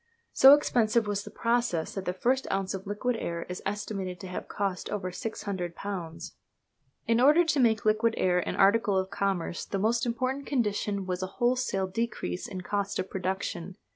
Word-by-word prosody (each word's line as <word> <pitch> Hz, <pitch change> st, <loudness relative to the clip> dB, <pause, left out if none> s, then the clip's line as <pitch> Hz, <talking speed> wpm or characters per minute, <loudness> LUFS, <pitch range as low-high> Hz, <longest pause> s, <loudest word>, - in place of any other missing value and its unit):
So 270 Hz, +2 st, +9 dB
expensive 235 Hz, -5 st, +2 dB
was 205 Hz, -1 st, -2 dB
the -, -, -9 dB
process 230 Hz, -8 st, 0 dB
that 195 Hz, -1 st, -5 dB
the -, -, 0 dB
first 255 Hz, +8 st, 0 dB
ounce 195 Hz, 0 st, -1 dB
of 195 Hz, +1 st, -6 dB
liquid 225 Hz, +4 st, -1 dB
air 170 Hz, -5 st, -3 dB
is 180 Hz, -, -6 dB
estimated 195 Hz, -3 st, -4 dB
to 190 Hz, -, -7 dB
have 180 Hz, -, -5 dB
cost 195 Hz, -3 st, -3 dB
over 190 Hz, -3 st, -3 dB
£600! 185 Hz, -3 st, -5 dB, 0.7 s
In 230 Hz, +1 st, +2 dB
order 300 Hz, +6 st, +6 dB
to 315 Hz, -3 st, +1 dB
make 220 Hz, -4 st, +3 dB
liquid 220 Hz, +2 st, +3 dB
air 180 Hz, -1 st, +2 dB
an -, -, -3 dB
article 200 Hz, 0 st, +4 dB
of 190 Hz, 0 st, -1 dB
commerce 195 Hz, -4 st, -1 dB
the 195 Hz, -, -3 dB
most 230 Hz, +4 st, +1 dB
important 260 Hz, +4 st, -2 dB
condition 205 Hz, -6 st, -1 dB
was 180 Hz, 0 st, -3 dB
a 185 Hz, -, -2 dB
wholesale 245 Hz, -6 st, +1 dB
decrease 190 Hz, -, -3 dB
in 185 Hz, -, -6 dB
cost 200 Hz, +1 st, -2 dB
of 185 Hz, -, -3 dB
production. 185 Hz, -1 st, -3 dB
200 Hz, 175 wpm, -28 LUFS, 185-230 Hz, 0.7 s, So